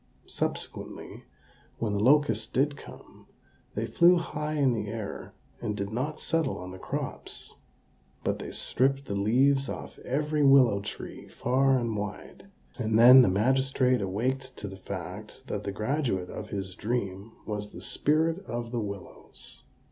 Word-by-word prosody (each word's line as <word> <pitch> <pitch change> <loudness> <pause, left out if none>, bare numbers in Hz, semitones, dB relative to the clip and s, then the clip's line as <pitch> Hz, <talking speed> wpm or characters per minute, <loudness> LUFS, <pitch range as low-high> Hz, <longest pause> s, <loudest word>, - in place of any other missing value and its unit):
Subsequently, - - -5 0.5
when 110 -3 -1
the 100 - 0
locusts 115 -2 +4
did 140 +4 +1
come, - - -14 0.5
they - - -1
flew 175 +1 +5
high 150 -3 -2
in 140 -4 +3
the 105 -2 -3
air, 110 -2 -6 0.3
and 105 -3 -2
did 100 0 -3
not 140 +7 -2
settle 165 0 0
on 90 +1 -7
the 95 - -9
crops; - - -5 0.7
but - - -1
they - - -6
stripped 135 +2 0
the 100 - -4
leaves 130 +7 +3
off - - -7
every 150 +3 0
willow 135 -7 +6
tree 100 - -7
far 135 +2 +2
and 115 -3 -1
wide; 105 - -6 0.3
and 110 -2 +1
then 125 +3 +10
the 120 - +4
magistrate 130 +4 +2
awaked 130 +7 -2
to 105 - -5
the 95 - -7
fact 95 +5 -7
that 105 -6 -4
the 100 - -1
graduate 110 -4 -1
of 105 - -7
his 95 -2 -4
dream 105 -1 -3
was 105 -1 -4
the - - -10
Spirit 160 +5 +1
of 120 -1 -4
the 120 - -1
Willows. 100 -2 -8
120 Hz, 155 wpm, -28 LUFS, 105-135 Hz, 0.7 s, then